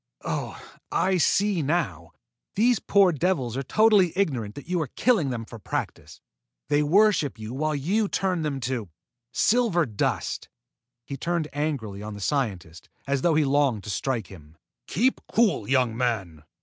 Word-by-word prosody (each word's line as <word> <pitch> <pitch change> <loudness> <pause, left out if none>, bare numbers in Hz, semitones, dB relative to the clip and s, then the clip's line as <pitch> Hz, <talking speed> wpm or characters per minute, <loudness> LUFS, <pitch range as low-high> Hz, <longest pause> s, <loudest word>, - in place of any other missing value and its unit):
Oh, - - -4 0.3
I 190 0 +2
see 195 +1 +2
now! 135 - -2 0.4
These 235 +2 +3
poor 200 -3 +4
devils 150 -7 -1
are 135 - -1
totally 205 - +4
ignorant 130 - -1
that 145 - -9
you 180 -1 0
are 155 - -2
killing 195 - +1
them 115 -3 -4
for 115 0 -11
practice. - - -5 0.5
They 145 0 +3
worship 175 - +3
you 110 +2 -7
while 155 +3 -1
you 195 +10 0
turn 185 -3 -1
them 145 -3 -2
to 120 -5 -3 0.4
silver 215 - +2
dust!" 110 -5 -2 0.6
He 140 - -6
turned 170 +1 -2
angrily 135 -10 -3
on 105 0 -6
the - - -9
scientist 100 - -3 0.2
as 140 -1 0
though 165 0 +3
he 155 -1 +3
longed 135 -6 +1
to 105 - -5
strike 115 +2 -2
him. 80 -4 -15 0.3
"Keep 250 +7 +1
cool, 220 - +2
young 125 -4 +2
man!" 95 -11 -2
145 Hz, 160 wpm, -25 LUFS, 115-180 Hz, 0.6 s, poor